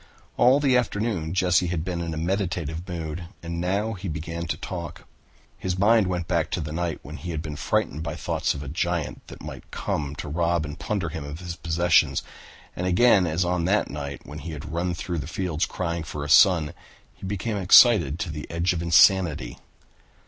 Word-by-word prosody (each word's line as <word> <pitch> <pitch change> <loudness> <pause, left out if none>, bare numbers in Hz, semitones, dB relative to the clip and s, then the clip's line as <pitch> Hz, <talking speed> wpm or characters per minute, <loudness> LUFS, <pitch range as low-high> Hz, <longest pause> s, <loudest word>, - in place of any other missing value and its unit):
All 125 +3 +5
the 135 -3 +3
afternoon 105 -8 -1
Jesse 90 -1 +3
had 85 -2 -2
been 90 -2 -3
in 85 -1 -3
a - - -5
meditative 85 -1 -2
mood 85 -1 -5 0.2
and 85 0 -4
now 100 +5 0
he 100 -1 -6
began 85 +1 -4
to - - -2
talk. 85 -4 -7 0.5
His 90 -1 -2
mind 105 +1 +4
went 90 -2 -2
back 85 -2 0
to - - -1
the 75 -1 -4
night 85 0 -2
when 75 +1 -8
he 80 +6 -7
had 80 -2 -3
been 75 -2 -5
frightened 75 +1 -1
by - - -4
thoughts - - -1
of 70 - -6
a - - -7
giant 85 +2 -2
that - - -11
might - - -9
come 75 -1 -3
to 75 - -6
rob 85 +1 0
and 75 +1 -8
plunder 100 -6 -2
him 80 -2 -6
of 75 +1 -7
his 90 -1 -6
possessions, 85 0 +2 0.5
and 90 - -2
again 95 0 +5
as 85 +3 0
on 90 -1 0
that 100 +4 +1
night 70 -1 -6
when 75 +1 -8
he 80 +2 -7
had 75 +1 -7
run 85 +1 -1
through 85 0 -3
the 70 - -5
fields 85 -1 -1
crying 85 -2 -3
for 75 -2 -5
a 75 - -5
son, 80 -1 +5 0.4
he - - -20
became 105 +2 -2
excited 95 - +6
to 85 -1 -3
the 75 0 -7
edge 85 +2 0
of 85 - -3
insanity. 85 -6 +4
85 Hz, 205 wpm, -25 LUFS, 80-90 Hz, 0.5 s, excited